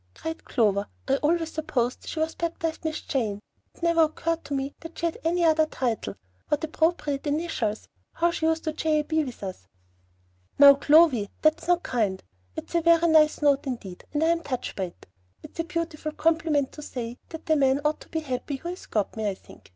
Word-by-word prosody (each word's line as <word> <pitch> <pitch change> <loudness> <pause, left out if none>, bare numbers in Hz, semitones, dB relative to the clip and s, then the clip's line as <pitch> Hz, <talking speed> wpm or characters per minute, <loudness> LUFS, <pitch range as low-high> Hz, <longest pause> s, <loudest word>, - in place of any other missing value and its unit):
cried 320 0 -6
Clover. 205 -4 +1 0.2
"I 270 0 +3
always 325 +2 +1
supposed 255 -6 -2
she 320 - -4
was 320 +1 0
baptized 330 -1 -3
'Miss 315 -1 -2
Jane.' 220 -7 -2 0.4
It - - -17
never 335 -1 +4
occurred 330 +1 -2
to 285 - -3
me 275 +1 -2
that 330 0 -10
she 340 - -2
had 335 - -2
any 340 +2 +1
other 315 -1 +4
title. 225 - -2 0.3
What 295 - 0
appropriate 315 -3 0
initials! 290 -9 -2 0.3
How 340 +1 +2
she 325 -1 -1
used 320 0 +1
to 315 - -2
J.A.B. 310 0 +1
with 250 -5 -8
us!" 185 - -7 0.9
"Now, 280 -1 +10
Clovy, 285 -7 +4
that's 310 +2 +2
not 355 0 +3
kind. 205 -6 -1 0.3
It's - - -7
a 340 - +3
very 335 0 +5
nice 310 -1 +4
note 280 -1 +3
indeed, 200 -8 -6
and 295 +1 0
I 325 - +3
am 335 0 +2
touched 265 -6 -4
by 190 - -1
it. 175 - -13 0.4
It's - - -13
a - - +2
beautiful 335 -3 -3
compliment 315 -3 +1
to 300 - -10
say 245 -4 -6
that 320 0 -8
the 315 - +3
man 270 -1 +3
ought 300 +1 +1
to - - -15
be 320 - -2
happy 275 0 -3
who 340 +6 -6
has 360 +1 -8
got 210 -3 -1
me, 215 -2 -1
I 195 - -3
think. - - -17
305 Hz, 205 wpm, -26 LUFS, 255-325 Hz, 0.9 s, Now